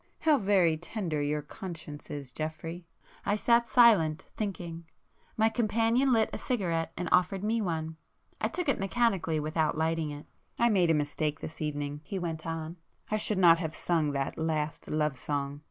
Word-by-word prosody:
How 305 -3 +4
very 190 -6 +3
tender 175 -3 -3
your 150 +1 -1
conscience 160 -3 -8
is, 140 -3 -6
Geoffrey!" 165 +4 -5 0.4
I 205 - +1
sat 235 +2 +3
silent, 215 -10 +5
thinking. 175 -5 -4 0.5
My 220 0 +4
companion 230 +3 +2
lit 225 -3 +3
a - - -3
cigarette 170 -10 -1
and 175 0 -2
offered 185 +2 +3
me 225 +2 +1
one. 160 -4 -3 0.4
I - - +2
took 360 -2 -3
it 275 - +2
mechanically 195 -6 +1
without 155 0 0
lighting 160 -1 0
it. 145 0 -8 0.3
"I 235 - +4
made 185 -6 +3
a 165 - +4
mistake 150 0 -1
this 160 - -8
evening,"—he 145 +3 -3
went 165 -3 -4
on—"I 165 +5 -5
should 210 -1 -1
not 170 -3 +6
have 160 -2 -3
sung 160 -4 +1
that 135 +2 -2
'Last 155 -1 -2
Love 150 -2 0
song. 140 +1 -3
165 Hz, 165 wpm, -29 LUFS, 155-205 Hz, 0.5 s, not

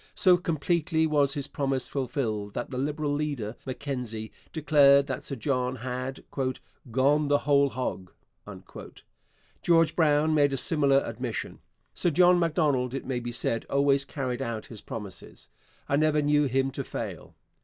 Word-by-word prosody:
So 185 -2 +5
completely 165 -1 0
was 145 -2 +2
his 140 -1 -2
promise 135 -3 -2
fulfilled 110 -7 -3
that - - -4
the 130 - -3
Liberal 145 +1 -1
leader, 140 -7 -3
Mackenzie, 125 -5 -5 0.2
declared 140 -3 +5
that 135 -2 -4
Sir 140 - -5
John 125 0 -1
had 130 +2 -5 0.7
'gone 145 +4 +3
the 145 0 +4
whole 140 -1 +3
hog.' 120 -8 -4 1.5
George 165 -2 +3
Brown 155 -1 +3
made 145 -2 +3
a - - -1
similar 140 0 +3
admission. - - -5 0.3
Sir 175 - 0
John 180 +3 +5
Macdonald, 145 -6 +1
it 135 - -5
may 130 -2 -2
be 120 0 -5
said, 115 -1 -1
always 140 0 +3
carried 135 -3 -4
out 115 -4 -4
his 110 -3 -11
promises. 105 -7 -9 0.4
I 140 - +1
never 155 0 +3
knew 145 0 +3
him 135 0 0
to - - -4
fail. - - -7
140 Hz, 150 wpm, -27 LUFS, 125-150 Hz, 1.5 s, So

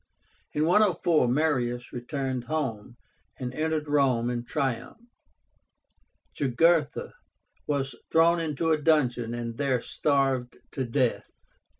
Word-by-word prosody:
In 150 +1 +1
104 175 - +3
Marius 125 -3 0
returned 130 0 -3
home, 120 -7 -3 0.4
and 125 -1 -5
entered 155 +1 -1
Rome 130 -5 +2
in 120 -1 -3
triumph. 135 - -2 1.4
Jugurtha 150 +3 +1 0.5
was 140 -2 -1 0.2
thrown 165 +1 +4
into 160 0 -1
a 155 -1 +2
dungeon, 125 -7 +2
and 115 -1 -5
there 135 -3 +1
starved 135 -2 0
to 130 - -3
death. 120 0 0
140 Hz, 105 wpm, -27 LUFS, 120-155 Hz, 1.4 s, thrown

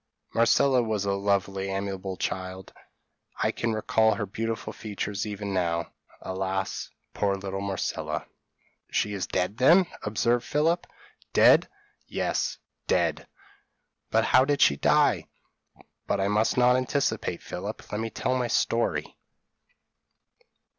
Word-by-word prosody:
Marcella 125 +3 +4
was 110 -3 -1
a 100 - +1
lovely, 100 -1 0
amiable 95 -1 -3
child; 95 0 -4 0.6
I - - +1
can 115 - -2
recall 110 0 +2
her 105 - -2
beautiful 115 +3 -4
features 105 -1 -4
even 100 -1 -4
now 85 -2 -1 0.3
Alas! 95 0 -3 0.2
poor 100 -1 +1
little 95 0 -5
Marcella." 100 -2 -3 0.6
"She 105 - 0
is 95 -3 -3
dead, 95 +4 -1
then?" 170 +9 +6 0.2
observed 115 +3 +1
Philip. 160 +6 +1 0.5
"Dead! - - +6 0.4
yes, - - -1 0.3
dead! - - +1 0.8
but - - +2
how 130 +1 +5
did 145 +1 +1
she 70 - +5
die? - - +3 0.8
But - - 0
I 95 +1 +1
must 105 +3 +2
not 125 0 +5
anticipate, 130 - -1
Philip; 100 +4 -6
let 105 - -2
me 115 - -2
tell 130 +4 -1
my 125 -1 0
story. 115 0 0
105 Hz, 125 wpm, -27 LUFS, 95-115 Hz, 0.8 s, then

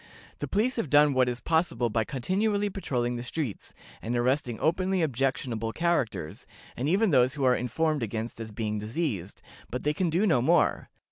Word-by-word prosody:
The - - -3
police 235 +6 0
have 200 - -1
done 145 0 +5
what 130 -1 +3
is 125 0 -4
possible 160 -8 +1
by 110 0 +1
continually 200 - 0
patrolling 125 -10 -2
the - - -4
streets, 125 -2 -4 0.3
and 120 +2 -2
arresting 125 -1 0
openly 185 +2 +1
objectionable 130 -5 -1
characters, 120 - -1 0.3
and 130 +5 -1
even 195 +3 +3
those 130 0 +4
who 140 - -3
are 125 -1 +5
informed 150 +4 0
against 115 +1 -4
as 110 -1 -6
being 105 -1 -2
diseased, 105 - -3 0.3
but 125 - -4
they 150 - +1
can 175 +3 0
do 175 +6 +2
no 160 - +3
more. 125 - +2
130 Hz, 180 wpm, -28 LUFS, 120-165 Hz, 0.3 s, done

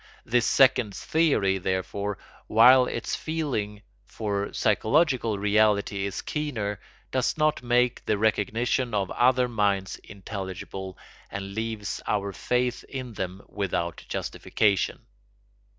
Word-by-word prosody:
This 120 0 +2
second 125 -6 +4
theory, 120 -13 +1
therefore, 95 +2 -2 0.3
while 125 +4 +7
its 115 - -3
feeling 120 -11 -3 0.2
for 100 -2 -3
psychological 115 - +2
reality 100 -1 +2
is 100 - -5
keener, 115 -10 -3 0.3
does 130 +4 0
not 155 -2 +2
make 125 0 +1
the 105 - +2
recognition 115 +2 0
of 100 -2 -1
other 125 0 +3
minds 100 -5 0
intelligible 95 -1 -7 0.3
and 100 0 -6
leaves 110 -1 -3
our 100 -1 -1
faith 125 +2 -1
in 130 -3 -6
them 95 -1 -5
without 85 -4 -3
justification. 100 -3 0
110 Hz, 110 wpm, -26 LUFS, 100-125 Hz, 0.3 s, while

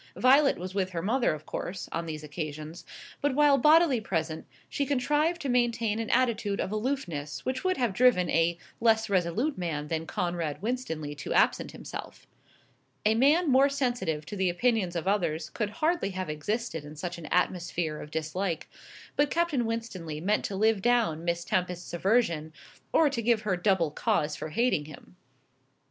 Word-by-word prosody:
Violet 275 +3 +5
was 185 +1 -6
with 190 -1 0
her 165 - -2
mother, 240 +5 +2
of 155 0 -6
course, 185 +1 -5
on 165 0 -3
these 155 -1 -5
occasions; 155 +2 -6 0.4
but, 285 -2 +1
while 290 -1 +5
bodily 305 -3 +5
present, 160 -6 -3 0.2
she 285 - -1
contrived 295 +5 +1
to - - -2
maintain 235 -3 +1
an 225 - -3
attitude 225 -5 +1
of - - -2
aloofness 210 - -3
which 260 0 -2
would 370 0 +1
have 240 -6 0
driven 230 -5 +4
a 165 +1 +2 0.2
less 225 -2 +3
resolute 195 - 0
man 150 -4 -3
than 160 0 -2
Conrad 170 -4 -2
Winstanley 180 - -3
to - - -4
absent - - +3
himself. - - -9 0.8
A 215 - +5
man 285 +7 +4
more 270 +2 +5
sensitive 245 - -1
to 205 - -7
the 190 -2 +1
opinions 190 -1 +1
of 170 +2 -3
others 170 -6 0
could 215 -3 -2
hardly 310 - 0
have 185 -4 -4
existed 165 +2 -3
in 150 +1 -10
such 175 +2 -5
an 160 - -8
atmosphere 175 -3 -1
of 150 - -9
dislike; 160 +2 -3 0.5
but 290 0 +3
Captain 320 -9 +1
Winstanley 185 -9 -4
meant 205 +6 +1
to 200 - -3
live 215 0 +2
down 225 -9 +2
Miss 170 0 -1
Tempest's 180 -1 -2
aversion, 170 -5 +1 0.4
or 320 - +5
to 240 -4 -2
give 230 -1 +2
her 200 -3 +1
double 175 -3 +1
cause 150 0 0
for 155 - -6
hating 195 -4 +1
him. 155 +4 -13
195 Hz, 170 wpm, -28 LUFS, 165-245 Hz, 0.8 s, Violet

